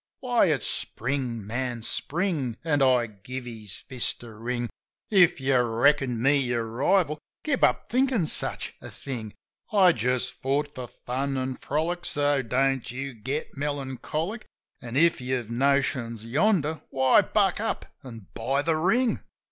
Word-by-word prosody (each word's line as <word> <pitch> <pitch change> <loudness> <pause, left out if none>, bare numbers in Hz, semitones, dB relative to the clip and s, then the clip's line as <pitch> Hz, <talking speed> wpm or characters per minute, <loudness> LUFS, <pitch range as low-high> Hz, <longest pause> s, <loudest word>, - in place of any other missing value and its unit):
"Why, 245 -5 +3
ifs 150 -7 +1
Spring, 120 -3 -1
man. 120 +1 -3
Spring!" 150 - -1
(An' 145 -3 +1
I 130 -3 +4
gave 115 +4 -8
his 110 -4 -5
fist 125 -2 -3
a 115 -2 -10
wring) 120 +2 -3 0.4
"If 180 -6 +5
you 135 -1 +3
reckoned 120 0 +2
me 140 +2 +5
your 120 -3 0
rival, 150 - +1 0.2
give 285 -4 0
up - - +2
thinkin' 255 -6 +2
such - - -1
a - - -8
thing. 115 -6 -7 0.4
I 195 -4 +6
just 125 0 -1
fought 145 +2 0
for 125 -1 -6
fun 135 +4 -3
an' 130 0 -2
frolic, 165 +4 -2
so 145 -1 +2
don't 130 +1 0
you 135 +2 -5
get 130 +7 -4
melancholic; 145 - -3 0.3
An', 120 -1 -7
if 165 -2 +4
you 130 +1 -1
have 120 -3 -4
notions 125 -3 +1
yonder, 160 - +1
why, 130 +9 +5
buck 200 -2 +1
up 225 - -2 0.2
an' 115 -6 -10
buy 135 +5 0
the 160 0 +1
ring! 225 +9 +2
135 Hz, 150 wpm, -26 LUFS, 120-155 Hz, 0.4 s, I